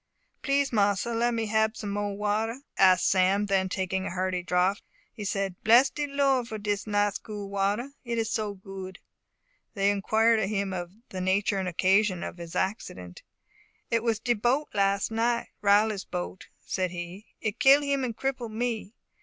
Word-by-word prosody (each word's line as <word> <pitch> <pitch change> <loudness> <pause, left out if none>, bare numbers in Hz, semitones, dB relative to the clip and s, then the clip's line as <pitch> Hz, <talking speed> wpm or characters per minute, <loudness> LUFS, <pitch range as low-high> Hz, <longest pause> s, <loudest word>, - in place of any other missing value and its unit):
"Please 275 0 +1
mossa, 205 +2 +2
let 235 +1 +1
me 225 -1 -1
hab 220 +1 +1
some 205 -3 -4
mo'e 205 0 -2
water?" 215 +4 -1 0.4
Sam 185 +2 +3
asked; 205 - -4
then 190 -1 +2
taking 190 +1 -2
a - - -3
hearty 185 0 -1
draught, 180 +3 +1 0.3
he 210 - -7
said, 195 -2 -2
"Bless 240 +5 +6
de 295 -1 -3
Lord 275 -3 +1
for 220 - -5
dis 205 0 -2
nice 205 -1 +1
cool 205 -2 -7
water! 200 +7 0
It 235 -2 -3
is 225 -1 0
so 210 -2 -2
good!" 190 -1 -9 0.8
They 200 0 +3
inquired 220 +3 +3
of 195 -2 0
him 200 -2 -1 0.4
the 185 - -5
nature 195 +2 +1
and 190 - -2
occasion 185 +1 +2
of - - -6
his 170 0 -8
accident. 95 - -3 0.7
"It 230 -1 +2
was 230 -2 +1
de 240 +2 +1
boat 245 +7 0
las' 200 +1 +1
night 235 +1 0
Riley's 205 0 +3
boat," 180 +1 -5 0.2
said 185 -1 -1
he. 175 +4 -7
"It 215 +1 -3
kill 275 +2 +6
him 280 -1 0
and 235 -3 -3
cripple 255 -3 -2
me. 225 -1 -3
205 Hz, 175 wpm, -27 LUFS, 190-230 Hz, 0.8 s, Bless